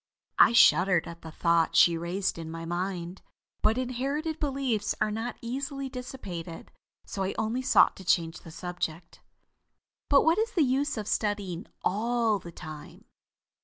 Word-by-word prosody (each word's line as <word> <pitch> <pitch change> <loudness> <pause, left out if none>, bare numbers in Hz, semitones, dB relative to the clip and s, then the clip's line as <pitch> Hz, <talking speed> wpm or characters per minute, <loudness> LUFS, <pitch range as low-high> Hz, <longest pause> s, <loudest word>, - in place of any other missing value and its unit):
I - - +7
shuddered 185 -6 +5
at 170 0 -9
the 160 - -9
thought 170 0 +1
she 170 - +6
raised 170 +2 -2
in 160 -1 -6
my 165 0 -6
mind. 175 +1 -4 0.4
But 220 +2 +3
inherited 275 +5 -2
beliefs 260 -8 -1
are 215 - +1
not 225 +3 -4
easily 275 +3 -4
dissipated, 190 -10 -7 0.3
so 195 - -5
I 190 0 -1
only 225 +4 -1
sought 255 - +5
to 190 - -10
change 165 -2 +1
the - - -13
subject. 170 -1 -5 0.9
"But 280 -1 +6
what 325 +5 +4
is 460 +2 -1
the 330 - +3
use 275 +1 0
of 210 -2 -4
studying 205 -6 -2 0.2
all 225 +1 +1
the 170 -2 -10
time. 155 -2 -10
205 Hz, 155 wpm, -28 LUFS, 170-255 Hz, 0.9 s, I